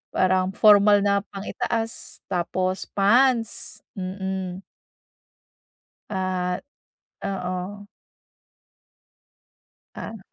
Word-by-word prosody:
parang 185 Hz, +1 st, +2 dB
formal 205 Hz, -1 st, +6 dB
na 200 Hz, 0 st, +3 dB
pang-itaas 225 Hz, +3 st, -4 dB
tapos 185 Hz, +1 st, -1 dB
pants. 230 Hz, +3 st, +2 dB, 0.2 s
Mm. 190 Hz, 0 st, -4 dB, 1.5 s
At 185 Hz, -1 st, -1 dB, 0.6 s
oo. 190 Hz, +1 st, -4 dB, 2.1 s
Ah. 225 Hz, -, -6 dB
190 Hz, 60 wpm, -24 LUFS, 185-205 Hz, 2.1 s, formal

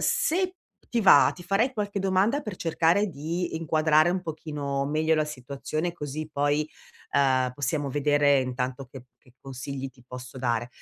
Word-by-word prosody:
se 375 Hz, -6 st, +1 dB, 0.4 s
ti 235 Hz, -, +2 dB
va, 190 Hz, -9 st, +7 dB
ti 175 Hz, -, -11 dB
farei 200 Hz, +8 st, +1 dB
qualche 205 Hz, -3 st, -3 dB
domanda 195 Hz, +9 st, +1 dB
per 210 Hz, -3 st, -5 dB
cercare 170 Hz, +5 st, +2 dB
di 165 Hz, +2 st, -3 dB
inquadrare 155 Hz, 0 st, +3 dB
un 185 Hz, +1 st, -1 dB
pochino 150 Hz, -4 st, -3 dB
meglio 155 Hz, +2 st, +1 dB
la 155 Hz, -, +2 dB
situazione 150 Hz, +4 st, -4 dB
così 155 Hz, -1 st, -5 dB
poi, 145 Hz, +1 st, 0 dB, 0.4 s
uhm, 130 Hz, -2 st, +3 dB
possiamo 145 Hz, +1 st, -1 dB
vedere 145 Hz, 0 st, +3 dB
intanto 130 Hz, +1 st, -3 dB
che 130 Hz, -2 st, -10 dB
che 125 Hz, -, -24 dB
consigli 135 Hz, +1 st, -6 dB
ti 130 Hz, -1 st, -20 dB
posso 125 Hz, +1 st, -9 dB
dare. 120 Hz, -2 st, -1 dB
150 Hz, 155 wpm, -26 LUFS, 135-175 Hz, 0.4 s, va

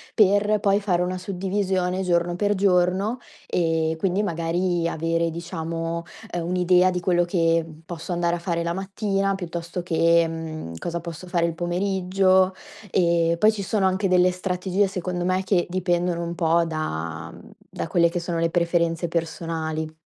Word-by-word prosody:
per 205 Hz, 0 st, +4 dB
poi 200 Hz, 0 st, +3 dB
fare 185 Hz, -4 st, 0 dB
una 180 Hz, +1 st, -1 dB
suddivisione 190 Hz, 0 st, -1 dB
giorno 175 Hz, -1 st, +1 dB
per 205 Hz, +1 st, +1 dB
giorno, 190 Hz, +3 st, +2 dB, 0.3 s
e 160 Hz, -2 st, 0 dB
quindi 190 Hz, +3 st, +1 dB
magari 170 Hz, -1 st, 0 dB
avere 165 Hz, +1 st, 0 dB
diciamo, 165 Hz, 0 st, -4 dB, 0.3 s
ehm, 170 Hz, -1 st, -3 dB
un'idea 180 Hz, +1 st, +3 dB
di 180 Hz, -1 st, -2 dB
quello 175 Hz, -1 st, +2 dB
che 165 Hz, -2 st, +2 dB, 0.2 s
posso 170 Hz, +1 st, -5 dB
andare 170 Hz, 0 st, 0 dB
a -, -, -9 dB
fare 170 Hz, -1 st, -2 dB
la 170 Hz, -, -1 dB
mattina, 195 Hz, +1 st, -1 dB
piuttosto 170 Hz, -1 st, -5 dB
che, 170 Hz, 0 st, +3 dB
mhmm, 160 Hz, -, -6 dB
cosa 170 Hz, -, -4 dB
posso 170 Hz, +1 st, -8 dB
fare 175 Hz, -1 st, +1 dB
il 170 Hz, -, -2 dB
pomeriggio. 185 Hz, +1 st, +2 dB, 0.4 s
E 170 Hz, -2 st, +2 dB
poi 215 Hz, +5 st, +5 dB
ci 210 Hz, -2 st, -5 dB
sono 195 Hz, 0 st, 0 dB
anche 190 Hz, +1 st, +1 dB
delle 180 Hz, 0 st, +4 dB
strategie, 185 Hz, +2 st, 0 dB
secondo 180 Hz, -2 st, -3 dB
me, 185 Hz, +1 st, +1 dB
che 190 Hz, -2 st, +2 dB
dipendono 175 Hz, -1 st, 0 dB
un 170 Hz, 0 st, -4 dB
po' 170 Hz, 0 st, +3 dB
da 85 Hz, -, -4 dB, 0.4 s
da -, -, -3 dB
quelle 170 Hz, -1 st, +3 dB
che 175 Hz, -, -2 dB
sono 170 Hz, 0 st, -3 dB
le 165 Hz, 0 st, +2 dB
preferenze 170 Hz, 0 st, +1 dB
personali. 160 Hz, -1 st, -3 dB
175 Hz, 160 wpm, -24 LUFS, 165-185 Hz, 0.4 s, poi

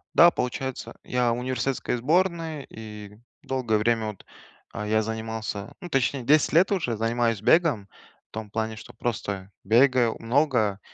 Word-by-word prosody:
Да, 170 Hz, -, +9 dB
получается, 130 Hz, -2 st, -4 dB
я 125 Hz, -1 st, +1 dB
в 115 Hz, -, -1 dB
университетской 130 Hz, 0 st, -1 dB
сборной, 160 Hz, +2 st, 0 dB
и 105 Hz, -2 st, -10 dB, 0.3 s
долгое 125 Hz, -5 st, 0 dB
время 110 Hz, 0 st, +1 dB
вот, 105 Hz, -3 st, -8 dB, 0.5 s
э, 105 Hz, 0 st, -4 dB
я 110 Hz, 0 st, +3 dB
занимался, 110 Hz, -1 st, -4 dB
ну, 175 Hz, -, -8 dB
точнее, 135 Hz, -2 st, 0 dB
10 150 Hz, +4 st, +4 dB
лет 180 Hz, +5 st, +5 dB
уже 145 Hz, -, 0 dB
занимаюсь 115 Hz, -1 st, 0 dB
бегом. 140 Hz, -, +3 dB, 0.4 s
В -, -, -72 dB
том 110 Hz, -1 st, -6 dB
плане, 110 Hz, +1 st, -2 dB
что -, -, -11 dB
просто 100 Hz, -4 st, -4 dB
бегаю 120 Hz, +2 st, +4 dB
много, 115 Hz, -5 st, +1 dB
115 Hz, 150 wpm, -26 LUFS, 110-135 Hz, 0.5 s, Да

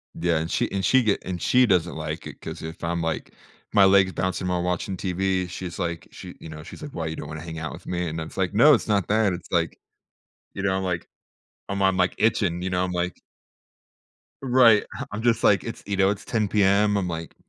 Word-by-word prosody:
Yeah. 85 Hz, -1 st, +1 dB
And 80 Hz, +2 st, -3 dB
she 120 Hz, -, 0 dB
and 95 Hz, -1 st, -2 dB
she 130 Hz, -2 st, +4 dB
get 105 Hz, -2 st, +1 dB
and 90 Hz, -2 st, -5 dB
she 125 Hz, 0 st, +4 dB
doesn't 90 Hz, -5 st, +1 dB
like 80 Hz, +1 st, -5 dB
it -, -, -11 dB
'cause -, -, -7 dB
if 80 Hz, +1 st, -8 dB
I'm 85 Hz, 0 st, -1 dB
like 80 Hz, -1 st, -3 dB, 0.4 s
my 100 Hz, -2 st, +6 dB
leg 95 Hz, 0 st, +6 dB
is 95 Hz, -, -7 dB
bouncing 95 Hz, 0 st, -2 dB
while 90 Hz, -1 st, 0 dB
watching 90 Hz, +1 st, -2 dB
TV, 95 Hz, 0 st, -1 dB
she's 90 Hz, -1 st, -6 dB
like 85 Hz, -3 st, -3 dB
she, -, -, -10 dB
you 80 Hz, -, -10 dB
know, 75 Hz, 0 st, -9 dB
she's -, -, -11 dB
like, 145 Hz, -, -7 dB
"Why, 80 Hz, -, -3 dB
you 80 Hz, 0 st, -3 dB
don't 75 Hz, -, -7 dB
wanna 75 Hz, 0 st, -7 dB
hang 80 Hz, -1 st, -7 dB
out 80 Hz, -, -4 dB
with -, -, -11 dB
me?" 90 Hz, -1 st, -2 dB
And 80 Hz, +1 st, -4 dB
I -, -, -3 dB
was -, -, -11 dB
like, 95 Hz, 0 st, 0 dB
"No, 145 Hz, +8 st, +7 dB
it's 115 Hz, -, +1 dB
not 100 Hz, -4 st, +1 dB
that." 110 Hz, -2 st, +3 dB
It's 85 Hz, -, -8 dB
like -, -, 0 dB, 0.8 s
you 95 Hz, -, -5 dB
know, 95 Hz, -1 st, +1 dB
I'm 95 Hz, -, -1 dB
like, 90 Hz, -2 st, -2 dB, 0.6 s
I'm 100 Hz, 0 st, -2 dB
I'm 95 Hz, -1 st, +3 dB
like 90 Hz, 0 st, +2 dB
itching, 90 Hz, -6 st, +1 dB
you 95 Hz, -, -2 dB
know? 90 Hz, 0 st, +1 dB
I'm 90 Hz, -, -3 dB
like 90 Hz, 0 st, -2 dB, 1.2 s
Right. 120 Hz, -5 st, +5 dB
Ha -, -, -5 dB
I'm 105 Hz, +2 st, -4 dB
just 120 Hz, -1 st, +2 dB
like, 100 Hz, -, +4 dB
"It's, 115 Hz, -, -7 dB
you 100 Hz, -1 st, -2 dB
know, 95 Hz, 0 st, +4 dB
it's 105 Hz, 0 st, -3 dB
10:00 110 Hz, -3 st, 0 dB
PM." 105 Hz, +1 st, +3 dB
I'm 95 Hz, -2 st, -1 dB
like, 80 Hz, -1 st, -6 dB
95 Hz, 245 wpm, -24 LUFS, 85-100 Hz, 1.2 s, No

